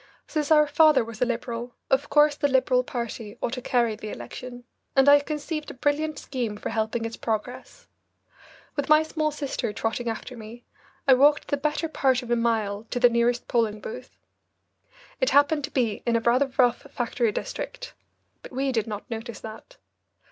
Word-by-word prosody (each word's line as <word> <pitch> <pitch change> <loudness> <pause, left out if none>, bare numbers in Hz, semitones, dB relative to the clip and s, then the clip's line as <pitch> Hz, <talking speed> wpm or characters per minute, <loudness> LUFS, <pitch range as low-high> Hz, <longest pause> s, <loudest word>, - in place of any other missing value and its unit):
Since 300 -3 -2
our 300 -1 +6
father 300 -2 +5
was 230 0 -10
a - - +5
Liberal, 240 0 -4 0.2
of 265 +1 +2
course 295 0 +5
the 285 - +1
Liberal 260 -2 +2
party 235 -3 -5
ought 235 - -2
to 250 - -4
carry 235 -3 +1
the 215 - -7
election, 245 - -8 0.3
and 270 0 +5
I 285 0 +8
conceived 305 +1 -4
a - - -8
brilliant 295 +3 0
scheme 240 -8 -4
for - - -5
helping 225 +1 -1
its 225 0 -5
progress. 225 +2 -4 0.9
With 285 -1 -2
my 305 +1 +6
small 310 -1 -1
sister 285 -7 -3
trotting 225 +3 -2
after 240 +3 -6
me, 230 +1 -11 0.4
I 265 - +8
walked 290 +3 +4
the - - +2
better 300 +3 -1
part 265 -4 +1
of 240 - -7
a - - +4
mile 220 -3 0
to 245 - -2
the 245 -1 +6
nearest 235 +1 +1
polling 220 -3 0
booth. 250 +4 -9 1.0
It - - +2
happened 290 +1 +4
to 285 - -12
be 235 -6 0
in 235 - +3
a - - +4
rather 255 +4 +2
rough 245 +1 +2
factory 235 -2 0
district, - - -6 0.5
but - - -11
we 270 +1 -1
did 225 -4 -1
not 210 -2 -6
notice 225 0 -6
that. 220 - -10
250 Hz, 185 wpm, -25 LUFS, 230-285 Hz, 1.0 s, I